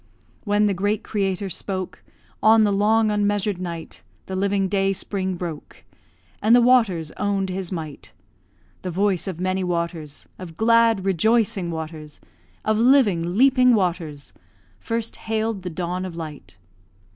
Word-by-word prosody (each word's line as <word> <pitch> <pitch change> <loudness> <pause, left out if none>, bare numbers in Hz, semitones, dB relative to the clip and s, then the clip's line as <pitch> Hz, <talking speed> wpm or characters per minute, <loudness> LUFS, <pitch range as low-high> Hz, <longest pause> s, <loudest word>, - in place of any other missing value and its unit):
When 205 0 +2
the 205 - +2
great 205 +3 -1
Creator 195 -2 -2
spoke, 185 +1 -4 0.4
On 220 +1 +6
the 205 - +2
long 215 +2 +3
unmeasured 205 -2 0
night 165 - -7 0.2
The 190 - -5
living 195 0 +1
day 195 0 +1
spring 190 -1 -3
broke, 170 -4 -7 0.6
And 220 +3 +5
the 245 - +6
waters 210 -11 +3
own'd 200 -2 -1
His 185 -1 -4
might; 155 -5 -7 0.7
The 185 - -4
voice 190 +1 0
of 180 -3 -5
many 185 +1 -1
waters, 170 -4 -4
Of 170 -3 -9
glad, 230 -3 +3
rejoicing 195 0 +1
waters, 160 -2 -7 0.5
Of 215 0 +1
living, 205 -9 +3
leaping 255 -1 +5
waters, 170 -7 -2 0.5
First 230 0 -3
hailed 220 -2 -2
the 180 - -5
dawn 180 +2 -3
of 185 -3 -6
light. 150 - -9
190 Hz, 140 wpm, -23 LUFS, 170-215 Hz, 0.7 s, On